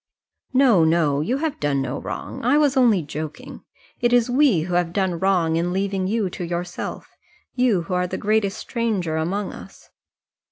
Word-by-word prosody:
"No 255 Hz, -9 st, +5 dB
no; 160 Hz, -3 st, +2 dB
you 240 Hz, -, 0 dB
have 310 Hz, 0 st, -3 dB
done 145 Hz, -2 st, 0 dB
no 135 Hz, 0 st, -3 dB
wrong. -, -, -6 dB
I 255 Hz, +5 st, +3 dB
was 290 Hz, -3 st, +3 dB
only 230 Hz, -9 st, +4 dB
joking. 155 Hz, +1 st, -7 dB, 0.4 s
It 240 Hz, -, +2 dB
is 245 Hz, 0 st, +3 dB
we 255 Hz, -, +4 dB
who 175 Hz, +3 st, -4 dB
have 175 Hz, -1 st, 0 dB
done 185 Hz, -3 st, 0 dB
wrong 175 Hz, -4 st, +2 dB
in 175 Hz, +1 st, 0 dB
leaving 190 Hz, 0 st, -1 dB
you 215 Hz, 0 st, 0 dB
to 180 Hz, -, -6 dB
yourself 175 Hz, +1 st, -5 dB, 0.4 s
you 245 Hz, -9 st, +2 dB
who 185 Hz, -, -5 dB
are 180 Hz, 0 st, +1 dB
the -, -, -4 dB
greatest 210 Hz, -2 st, 0 dB
stranger 210 Hz, -9 st, -2 dB
among 185 Hz, +6 st, -2 dB
us." -, -, -13 dB
190 Hz, 175 wpm, -22 LUFS, 165-230 Hz, 0.4 s, No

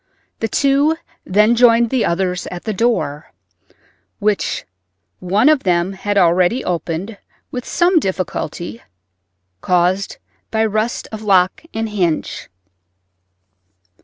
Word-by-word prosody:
The 225 Hz, -, -1 dB
two 280 Hz, +6 st, +2 dB, 0.3 s
then 210 Hz, +5 st, +3 dB
joined 235 Hz, -1 st, +4 dB
the 255 Hz, -4 st, +1 dB
others 180 Hz, +1 st, -1 dB
at 175 Hz, -1 st, -7 dB
the 215 Hz, -, -2 dB
door, 190 Hz, -9 st, -1 dB, 0.9 s
which 210 Hz, -1 st, -1 dB, 0.5 s
one 195 Hz, +7 st, +2 dB
of 305 Hz, -3 st, +4 dB
them 175 Hz, +1 st, +1 dB
had 205 Hz, +2 st, -2 dB
already 185 Hz, +7 st, +3 dB
opened 180 Hz, +4 st, -3 dB, 0.3 s
with 250 Hz, 0 st, -5 dB
some 350 Hz, 0 st, +3 dB
difficulty, 185 Hz, -, -4 dB, 0.8 s
caused 180 Hz, +2 st, +1 dB, 0.3 s
by 220 Hz, 0 st, +1 dB
rust 215 Hz, +2 st, -1 dB
of 220 Hz, -1 st, -6 dB
lock 190 Hz, -3 st, +2 dB
and 225 Hz, 0 st, -2 dB
hinge. 175 Hz, -, -2 dB
205 Hz, 110 wpm, -18 LUFS, 180-230 Hz, 0.9 s, joined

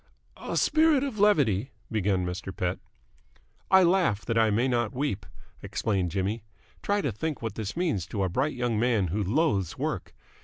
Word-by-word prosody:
"A -, -, -4 dB
spirit 315 Hz, -3 st, +4 dB
of 260 Hz, -7 st, -4 dB
levity 135 Hz, -, +3 dB
" -, -, -34 dB
began 100 Hz, -4 st, +1 dB
Mr. 90 Hz, +2 st, -4 dB
Pett. 90 Hz, 0 st, -2 dB, 0.9 s
"I 190 Hz, -1 st, +7 dB
laugh 170 Hz, -, +2 dB
that 115 Hz, -, -1 dB
I 110 Hz, -1 st, +4 dB
may 115 Hz, +5 st, +2 dB
not 120 Hz, -1 st, 0 dB
weep," 130 Hz, -8 st, -2 dB, 0.3 s
explained 95 Hz, -5 st, -1 dB
Jimmy. 100 Hz, +5 st, -2 dB, 0.4 s
"Try 205 Hz, 0 st, +1 dB
to 140 Hz, -, -1 dB
think 150 Hz, +6 st, -4 dB
what 110 Hz, -3 st, -3 dB
this 110 Hz, +5 st, -5 dB
means 150 Hz, -, 0 dB
to 100 Hz, 0 st, -2 dB
a -, -, +2 dB
bright 130 Hz, -, -1 dB
young 120 Hz, -3 st, 0 dB
man 115 Hz, -6 st, +2 dB
who 105 Hz, +6 st, -1 dB
loathes 100 Hz, -, 0 dB
work. -, -, -3 dB
115 Hz, 180 wpm, -27 LUFS, 100-155 Hz, 0.9 s, I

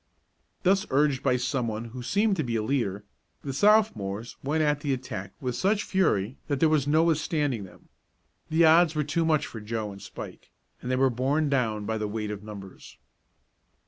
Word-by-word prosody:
Thus 195 Hz, +3 st, +3 dB
urged 140 Hz, -1 st, +2 dB
by 125 Hz, -, +2 dB
someone 120 Hz, -3 st, -2 dB
who 125 Hz, -, -6 dB
seemed 200 Hz, -, +1 dB
to 155 Hz, -, 0 dB
be 120 Hz, -2 st, -2 dB
a 110 Hz, -, 0 dB
leader, 105 Hz, -5 st, -1 dB, 0.4 s
the 135 Hz, -, -4 dB
Sophomores 120 Hz, -, +2 dB
went 155 Hz, +3 st, +1 dB
at 150 Hz, -1 st, +1 dB
the 145 Hz, -2 st, -1 dB
attack 105 Hz, -7 st, -5 dB
with 125 Hz, -3 st, -3 dB
such 200 Hz, -, +1 dB
fury 130 Hz, -, +1 dB
that 140 Hz, -3 st, -1 dB
there 160 Hz, -, +4 dB
was 150 Hz, -3 st, +2 dB
no 155 Hz, +2 st, +4 dB
withstanding 150 Hz, -, 0 dB
them. 95 Hz, -, -17 dB, 0.6 s
The 160 Hz, +1 st, +4 dB
odds 160 Hz, 0 st, +5 dB
were 150 Hz, -, +1 dB
too 150 Hz, +3 st, 0 dB
much 155 Hz, -2 st, +2 dB
for 110 Hz, -, -8 dB
Joe 110 Hz, -1 st, -3 dB
and 100 Hz, 0 st, -11 dB
Spike, -, -, -9 dB, 0.3 s
and 125 Hz, -, -5 dB
they 130 Hz, -, +2 dB
were 130 Hz, 0 st, +3 dB
borne 140 Hz, +5 st, 0 dB
down 110 Hz, -6 st, 0 dB
by 110 Hz, +1 st, -2 dB
the 105 Hz, -, -2 dB
weight 105 Hz, 0 st, -3 dB
of 105 Hz, -1 st, -6 dB
numbers. 100 Hz, -3 st, -11 dB
130 Hz, 190 wpm, -27 LUFS, 110-155 Hz, 0.6 s, odds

